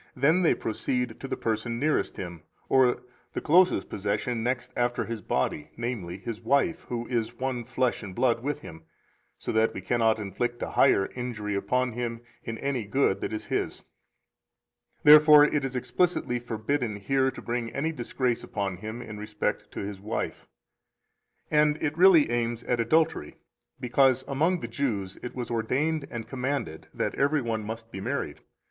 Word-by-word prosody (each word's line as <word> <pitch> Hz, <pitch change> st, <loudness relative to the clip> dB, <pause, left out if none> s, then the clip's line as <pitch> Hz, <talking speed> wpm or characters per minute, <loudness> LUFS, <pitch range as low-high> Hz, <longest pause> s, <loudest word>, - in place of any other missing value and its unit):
Then 160 Hz, +6 st, +3 dB
they 170 Hz, -, +4 dB
proceed 125 Hz, +1 st, -2 dB
to 135 Hz, -, -6 dB
the -, -, -3 dB
person 115 Hz, +1 st, -2 dB
nearest 150 Hz, -7 st, 0 dB
him, 85 Hz, -3 st, -6 dB, 0.3 s
or 125 Hz, -2 st, +4 dB, 0.3 s
the -, -, -1 dB
closest 175 Hz, -, +4 dB
possession 105 Hz, +4 st, -2 dB
next 125 Hz, +2 st, -2 dB
after 120 Hz, 0 st, 0 dB
his 115 Hz, -2 st, -5 dB
body, 75 Hz, -6 st, -1 dB
namely, 115 Hz, -7 st, -4 dB
his 115 Hz, +2 st, -6 dB
wife, 140 Hz, +4 st, +1 dB
who 120 Hz, -1 st, -3 dB
is 115 Hz, -3 st, -2 dB
one 130 Hz, -2 st, -2 dB
flesh 125 Hz, 0 st, 0 dB
and 95 Hz, -4 st, -8 dB
blood 120 Hz, -2 st, +2 dB
with 145 Hz, +3 st, -3 dB
him, 80 Hz, -, -10 dB, 0.6 s
so -, -, -4 dB
that 110 Hz, +1 st, +2 dB
we -, -, -4 dB
cannot 115 Hz, +3 st, +2 dB
inflict 120 Hz, +4 st, -3 dB
a -, -, -4 dB
higher 115 Hz, -8 st, +4 dB
injury 115 Hz, -5 st, -4 dB
upon 125 Hz, +5 st, 0 dB
him 115 Hz, 0 st, -4 dB, 0.2 s
in 115 Hz, -1 st, -5 dB
any 135 Hz, -3 st, -1 dB
good 100 Hz, -3 st, +1 dB
that -, -, -2 dB
is 110 Hz, -, -4 dB
his. -, -, -2 dB, 1.2 s
Therefore 150 Hz, 0 st, +9 dB
it 150 Hz, -1 st, 0 dB
is 135 Hz, -1 st, -3 dB
explicitly 125 Hz, -1 st, 0 dB
forbidden 120 Hz, 0 st, -2 dB
here 130 Hz, +6 st, +1 dB
to 130 Hz, -, -8 dB
bring 120 Hz, -1 st, -3 dB
any 150 Hz, +7 st, -1 dB
disgrace 125 Hz, -3 st, -1 dB
upon 100 Hz, -3 st, -3 dB
him 110 Hz, +5 st, -6 dB
in 110 Hz, -3 st, -8 dB
respect 105 Hz, 0 st, -3 dB
to -, -, -4 dB
his 100 Hz, -1 st, -5 dB
wife. 110 Hz, +3 st, -4 dB, 1.0 s
201 150 Hz, -1 st, +5 dB
And 150 Hz, 0 st, +2 dB
it 155 Hz, 0 st, -1 dB
really 170 Hz, -7 st, +6 dB
aims 120 Hz, 0 st, -1 dB
at 120 Hz, -, 0 dB
adultery, 155 Hz, -, +1 dB, 0.4 s
because 130 Hz, +1 st, +3 dB
among 160 Hz, +6 st, +1 dB
the -, -, -4 dB
Jews 110 Hz, -6 st, -2 dB
it 125 Hz, -, -7 dB
was 120 Hz, -2 st, -4 dB
ordained 140 Hz, +7 st, 0 dB
and 115 Hz, -1 st, -6 dB
commanded 130 Hz, -, -3 dB
that -, -, -2 dB
every 145 Hz, 0 st, +1 dB
one 110 Hz, -2 st, -2 dB
must 115 Hz, +1 st, -7 dB
be 95 Hz, -, -6 dB
married. -, -, -3 dB
120 Hz, 170 wpm, -27 LUFS, 110-135 Hz, 1.2 s, Therefore